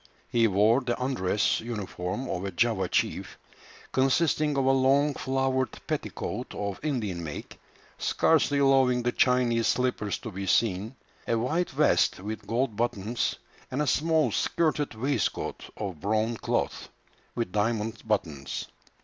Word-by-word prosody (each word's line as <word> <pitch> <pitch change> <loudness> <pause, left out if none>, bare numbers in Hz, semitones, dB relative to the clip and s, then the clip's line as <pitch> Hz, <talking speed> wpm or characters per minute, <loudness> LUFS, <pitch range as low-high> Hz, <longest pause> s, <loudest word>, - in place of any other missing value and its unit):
He 115 -1 +3
wore 110 +5 +4
the 120 -2 -2
undress 115 -6 +1
uniform 105 0 -4
of 90 - -3
a 100 - -2
Java 95 -1 +1
chief, - - -1 0.5
consisting 145 +2 +2
of 135 - +2
a 135 - +5
long 135 +2 +3
flowered 130 -1 -1
petticoat - - -4
of 100 -1 -3
Indian 110 - -2
make, 75 -3 -7 0.4
scarcely 150 -3 +2
allowing 135 -3 +4
the 120 - +1
Chinese 120 -2 +2
slippers 125 -5 0
to 110 - -7
be 95 0 -5
seen, 105 +4 +1 0.3
a 115 - +2
white 155 +10 0
vest - - +2
with 105 +3 -6
gold 115 0 0
buttons, 115 0 -1 0.3
and 130 - -3
a 150 - +2
small 160 +3 +2
skirted 155 -6 0
waistcoat 130 +1 -2
of 95 -7 -5
brown 110 +4 0
cloth, - - -2 0.5
with 115 -6 -2
diamond 110 +1 -1
buttons. 80 -11 -2
120 Hz, 135 wpm, -27 LUFS, 105-135 Hz, 0.5 s, a